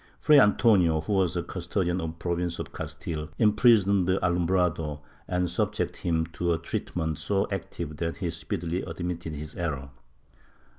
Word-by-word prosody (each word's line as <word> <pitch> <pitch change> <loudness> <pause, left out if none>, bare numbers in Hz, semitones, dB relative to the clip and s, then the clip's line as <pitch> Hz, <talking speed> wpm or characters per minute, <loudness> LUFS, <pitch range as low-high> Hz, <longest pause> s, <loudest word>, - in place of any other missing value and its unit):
Fray 150 -2 +6
Antonio, 100 - +4
who 80 - -2
was 90 -3 +2
custodian 90 0 -1
of 80 - -2
the - - -22
Province 85 0 -2
of - - -6
Cas - - -5
tile, 75 -2 -5
imprisoned 105 -4 +4
the 95 0 +3
alumbrado 85 -4 0 0.3
and 90 0 0
subjected 85 - -1
him 80 -1 0
to 85 0 -1
treatment 80 -1 -3
so 100 0 0
active 85 -5 -5
that 85 +1 -2
he 90 -4 -2
speedily 85 0 -3
admitted 85 -2 -4
his 75 +1 -7
error. 70 -5 -3
85 Hz, 150 wpm, -27 LUFS, 80-95 Hz, 0.3 s, Fray